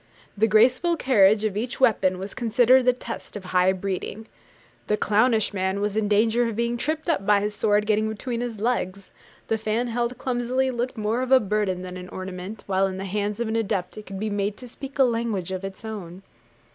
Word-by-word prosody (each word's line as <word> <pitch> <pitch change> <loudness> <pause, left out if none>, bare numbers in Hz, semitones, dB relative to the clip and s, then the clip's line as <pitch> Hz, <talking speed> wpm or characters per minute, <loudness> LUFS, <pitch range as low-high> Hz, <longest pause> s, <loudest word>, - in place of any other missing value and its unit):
The 215 +2 +3
graceful 255 +10 +4
carriage 215 -6 +4
of 210 -3 -1
each 240 +4 -3
weapon 195 -8 +3
was 195 +2 -6
considered 245 +2 +3
a - - +8
test 235 -3 -7
of 205 - -6
high 185 0 +3
breeding. 195 +3 -4 0.6
The 210 - +1
clownish 220 +1 +2
man 190 0 -1
was 205 0 -1
in 215 -1 +1
danger 225 +3 +3
of 230 - -4
being 235 +1 0
tripped 310 +6 -2
up 325 - +1
by 205 0 +4
his 210 +1 -2
sword 210 0 +2
getting 215 0 +1
between 230 +2 -4
his 235 -3 -4
legs: 200 -4 -2 0.4
the 225 - 0
fan 220 +3 -1
held 240 +1 -2
clumsily 255 +1 0
looked 245 +1 -3
more 220 +3 0
of 255 0 -3
a 265 - +8
burden 205 -4 -1
than 185 0 -7
an 180 0 -9
ornament; 185 +2 -7
while 195 0 +2
in 190 -1 -5
the 195 - -5
hands 205 +2 -2
of 235 - -1
an 220 - -2
adept 200 -5 -1
it 215 - -10
could 195 0 -6
be 215 +1 -2
made 205 0 -1
to 250 - -9
speak 275 +3 -9
a 270 - +6
language 230 -7 -1
of 185 0 -4
its 195 +3 -7
own. 195 -4 -7
215 Hz, 215 wpm, -24 LUFS, 195-240 Hz, 0.6 s, a